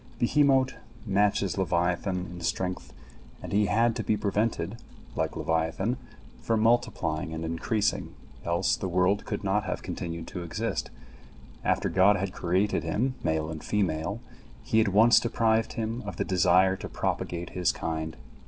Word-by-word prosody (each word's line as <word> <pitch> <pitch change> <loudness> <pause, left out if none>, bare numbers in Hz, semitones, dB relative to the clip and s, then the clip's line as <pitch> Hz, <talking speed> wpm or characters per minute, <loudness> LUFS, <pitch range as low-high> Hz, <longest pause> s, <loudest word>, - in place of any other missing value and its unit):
Behemot 135 +1 +3 0.3
matches 100 -1 +1
leviathan 90 +1 0
in 90 -1 -8
strength, 90 +2 -2 0.5
and - - -6
he 105 0 +3
had 115 +1 +2
to 115 - -2
be 105 - +1
prevented, 105 +2 -1 0.4
like - - -1
leviathan, 80 +9 0 0.4
from 115 -1 0
multiplying 80 -9 +1
and 80 +1 -4
increasing, 100 +6 -1 0.3
else 85 +2 +1
the 95 - -4
world 90 +3 +2
could - - -4
not 100 +2 +1
have - - -3
continued 85 -1 -5
to 90 - -5
exist; 110 +3 -3 0.7
after - - +1
God 100 +2 +5
had 95 -1 -2
created 95 +4 +1
him 130 +4 0
male 80 0 0
and 80 -1 -7
female, 100 0 -1 0.4
He 110 - +3
at 110 - +2
once 110 +4 +6
deprived 115 -1 +1
him 115 +2 -3
of - - -5
the - - -1
desire 95 +1 +4
to - - -7
propagate 85 0 -3
his 90 -2 +1
kind. 80 0 -4
95 Hz, 150 wpm, -28 LUFS, 85-110 Hz, 0.7 s, once